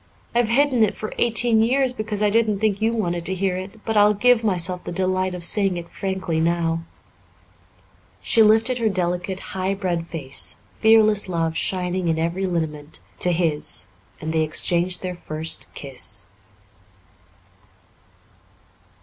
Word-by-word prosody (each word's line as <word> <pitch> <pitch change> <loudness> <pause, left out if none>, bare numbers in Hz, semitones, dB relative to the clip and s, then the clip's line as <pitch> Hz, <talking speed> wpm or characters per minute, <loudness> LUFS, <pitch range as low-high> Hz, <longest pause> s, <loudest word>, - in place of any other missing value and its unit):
I've 240 -1 +2
hidden 255 +1 +2
it 215 - +1
for 215 - -6
eighteen 235 -1 +3
years 255 +3 +2
because 215 -3 -3
I 205 - +3
didn't 220 -2 +2
think 210 0 0
you 225 +1 +2
wanted 175 -7 -2
to 190 - -2
hear 185 0 -1
it, 195 +4 -8
but 225 - -2
I'll 210 0 +5
give 245 +2 +3
myself 180 -3 0
the - - -6
delight 185 +1 -1
of 175 - -7
saying 195 0 +2
it 170 0 -7
frankly 190 -4 -3
now." 165 0 0 1.4
She 225 - +3
lifted 225 +4 +4
her 225 -2 +2
delicate, 180 0 -2
high 190 +1 -1
bred 175 -3 -2
face, 140 -6 -1 0.2
fearless 215 -3 +4
love 165 -2 -1
shining 180 0 -1
in 165 -1 +1
every 170 +4 -1
lineament, 155 -4 -4 0.2
to 180 - +2
his, 160 - 0 0.3
and 160 +1 -4
they 160 - +2
exchanged 175 +3 0
their 180 -1 -3
first 160 -2 -5
kiss. 115 -8 -4
185 Hz, 150 wpm, -22 LUFS, 170-215 Hz, 1.4 s, I'll